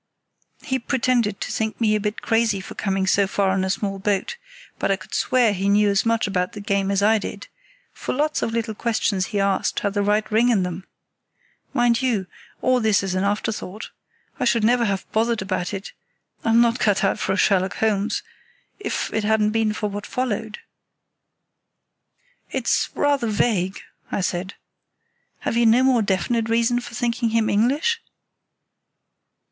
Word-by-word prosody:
"He 260 -1 -1
pretended 235 -4 0
to - - -3
think 220 -1 -2
me 220 -2 +2
a 215 - +2
bit 210 +1 -3
crazy 225 -3 +2
for 190 - -9
coming 195 -1 -1
so 195 +1 +3
far 195 0 +1
in 190 -1 0
a 190 - -1
small 195 0 -2
boat, 205 - -1 0.4
but - - 0
I 195 - +3
could 190 -1 -13
swear 240 -5 +2
he 195 +1 -1
knew 205 0 +4
as 200 +3 +1
much 230 0 +2
about 180 -2 -1
the 210 - -7
game 200 -1 0
as 200 0 +1
I 220 +1 +4
did; 200 0 -7 0.5
for - - -5
lots 300 +3 0
of - - -1
little 225 -1 -2
questions 210 -4 0
he 205 - -2
asked 195 -1 0
had 200 - -1
the 205 - 0
right 210 +1 +2
ring 230 +3 +4
in 210 -6 +3
them. 180 +1 -5 0.8
Mind 240 -2 +2
you, 235 -7 0 0.4
all 255 0 +3
this 215 -3 +2
is 190 -2 -2
an 185 +1 0
afterthought. 205 0 -3 0.5
I - - 0
should 235 -2 +2
never 240 +1 +3
have 195 -3 -1
bothered 225 -1 +1
about 185 -2 -2
it—I'm 220 +3 -3
not 235 +1 +3
cut 205 -1 +2
out 195 - +1
for - - 0
a - - -1
Sherlock 190 -3 +2
Holmes—if 215 -1 -3
it 220 - 0
hadn't 215 0 +2
been 220 -1 +1
for 210 0 -2
what 205 0 -6
followed." 220 -4 -3 1.9
"It's - - 0
rather 285 -4 +1
vague," 205 -3 0 0.3
I - - -1
said. 185 +1 -3 0.9
"Have - - -2
you 235 0 +4
no 235 +3 +5
more 260 -3 +4
definite 220 +4 0
reason 235 +1 +2
for 240 -1 -9
thinking 235 0 0
him 225 -1 +1
English?" 290 - +1
215 Hz, 175 wpm, -22 LUFS, 195-235 Hz, 1.9 s, no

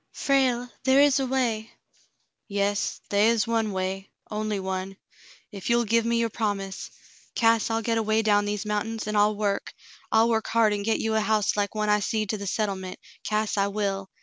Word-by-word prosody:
"Frale, 255 -3 +1 0.2
there 265 +1 +4
is 285 -1 +5
a 265 - -1
way 235 -4 -1 0.3
— - - -36
" - - -52
"Yes, 200 0 -1
they 205 +2 +4
is 230 -1 +2
one 225 -2 0
way 190 +1 -3
— - - -33
only 215 -1 -2
one. 190 0 -4 0.6
Ef 195 +1 -6
you'll 235 0 +3
give 230 +1 +2
me 235 0 +1
your 230 -1 0
promise, 200 -3 -3 0.5
Cass, 230 -2 +3
I'll 225 0 -1
get 230 0 +1
away 220 0 +1
down 205 -1 +3
these 205 0 -3
mountains, 215 +2 -2
an' 215 - -2
I'll 210 +1 +3
work; 205 -1 -2 0.4
I'll 220 +1 +4
work 220 -1 0
hard 225 -2 +3
an' 205 - -2
get 220 +2 +1
you 220 0 -1
a 220 - +2
house 215 -1 +1
like 205 +1 -1
one 215 0 0
I 210 0 +4
seed 215 0 -1
to 215 - -2
the 200 - -5
settlement, 190 -3 -2 0.3
Cass, 215 0 -1
I 200 0 +2
will. 195 -1 -2
215 Hz, 205 wpm, -26 LUFS, 200-225 Hz, 0.6 s, is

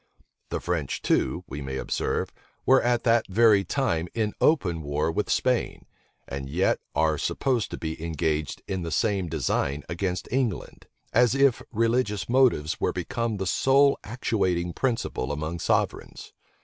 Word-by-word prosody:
The - - -2
French 85 -6 -2
too, - - +1
we 70 +2 -6
may 65 -1 -4
observe, - - -2 0.3
were 130 +1 +5
at 120 -1 +1
that 115 -2 +3
very 105 0 +4
time 90 - -1
in 110 -2 0
open 90 - +2
war 75 +2 -1
with 100 +5 -2
Spain, 125 -2 0 0.4
and 70 0 -5
yet 90 +7 +1 0.2
are 80 0 +2
supposed 125 -5 0
to - - -6
be 80 0 -5
engaged 80 -2 -2
in 95 -1 -2
the 85 - -4
same 100 0 0
design 75 -1 -1
against 90 0 -3
England; 120 -7 -2 0.3
as 120 +1 +4
if 135 -3 +3
religious 115 -3 0
motives 120 - +2
were - - +2
become 115 -2 -2
the 95 - -3
sole 135 +9 +3
actuating 95 -7 -1
principle 115 - -1
among 80 +3 -3
sovereigns. - - -2
95 Hz, 150 wpm, -26 LUFS, 80-120 Hz, 0.4 s, were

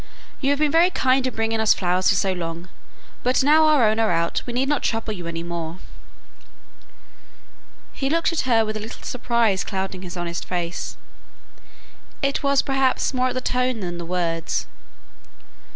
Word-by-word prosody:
"You 275 - 0
have 285 - +2
been 300 0 +2
very 335 +3 +5
kind 260 -6 +2
in 255 - -4
bringing 225 0 0
us 220 -1 +4
flowers 180 0 +1
so 195 -1 +2
long; 170 0 -5 0.5
but 255 +2 +2
now 310 +3 +5
our 290 -7 +5
own 215 +1 +1
are 225 -1 +3
out 170 0 0
we 240 - -4
need 260 +3 +1
not 295 0 +1
trouble 225 -1 -1
you 175 -4 -7
any 165 0 -4
more." 170 -1 -5 2.2
He 270 - -2
looked 330 +3 +1
at 280 -5 -1
her 225 -2 +4
with 215 0 -4
a - - -3
little 220 +3 -9
surprise 235 -5 +1
clouding 190 -2 -4
his 180 -1 -7
honest 170 0 -3
face; 175 -1 -4 1.3
it 275 0 +1
was 280 -1 +3
perhaps 270 -1 +1
more 255 0 +1
at 255 - -3
the 255 - -1
tone 250 -2 0
than 175 -2 -4
the 170 - -5
words. 170 -2 -1
Mrs. - - -30
225 Hz, 180 wpm, -23 LUFS, 180-260 Hz, 2.2 s, very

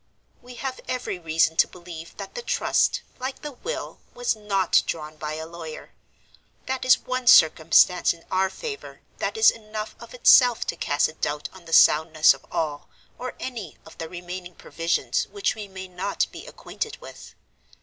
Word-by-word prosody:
"We 245 0 -12
have 260 0 -5
every 250 -7 -3
reason 160 -1 +1
to - - +5
believe 170 -2 -11
that 200 -1 -8
the 485 - -5
Trust, - - +1 0.2
like 260 +3 -5
the 295 - -5
Will, 445 - -6 0.2
was - - 0
not 200 -4 +2
drawn 155 -1 -4
by 155 0 -5
a 160 0 -5
lawyer. 165 -1 -9 0.7
That 260 0 -3
is 255 - +7
one 255 -1 -4
circumstance 165 -1 +6
in 170 -1 -10
our 190 0 +2
favor 430 - -8 0.2
that - - -2
is 440 - +7
enough 215 -1 -7
of - - -11
itself 250 - +6
to - - -2
cast 145 0 +1
a - - -10
doubt 150 -1 -3
on 185 -2 -15
the 165 - -11
soundness 155 0 +6
of - - -16
all, 150 -2 -3 0.3
or 255 - -5
any, 225 - -6
of 160 - -15
the 160 - -5
remaining 180 0 -8
provisions 165 +1 -1
which 405 -1 -1
we 210 -2 -8
may 190 -1 -8
not 185 +2 -1
be - - -10
acquainted 450 - -6
with. - - -12
185 Hz, 175 wpm, -25 LUFS, 160-250 Hz, 0.7 s, is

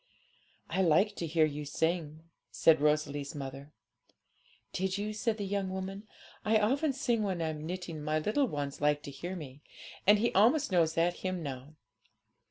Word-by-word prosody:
'I 190 - +1
liked 190 +5 +3
to 170 - -2
hear 160 0 +3
you 150 0 -4
sing,' 160 +1 -2 0.3
said 160 -3 +4
Rosalie's 150 -1 0
mother. 140 +1 -7 1.0
'Did 190 +1 -1
you?' 210 +1 -3
said 220 +1 -1
the 205 - -3
young 195 -1 -1
woman.' 190 +2 -5 0.4
I 220 +1 +4
often 270 +8 +2
sing 240 -4 0
when 190 -4 -1
I'm 155 -1 -3
knitting; 175 -3 -5
my 155 +1 0
little 215 - +1
one 145 -6 -3
likes 150 0 +2
to 140 - -7
hear 175 +7 -6
me, 145 -4 -9 0.5
and 205 +1 +8
he 235 +3 +1
almost 245 +7 +4
knows 165 -3 +3
that 170 +1 +2
hymn 185 -2 -3
now. 140 +1 -7
170 Hz, 170 wpm, -31 LUFS, 150-205 Hz, 1.0 s, and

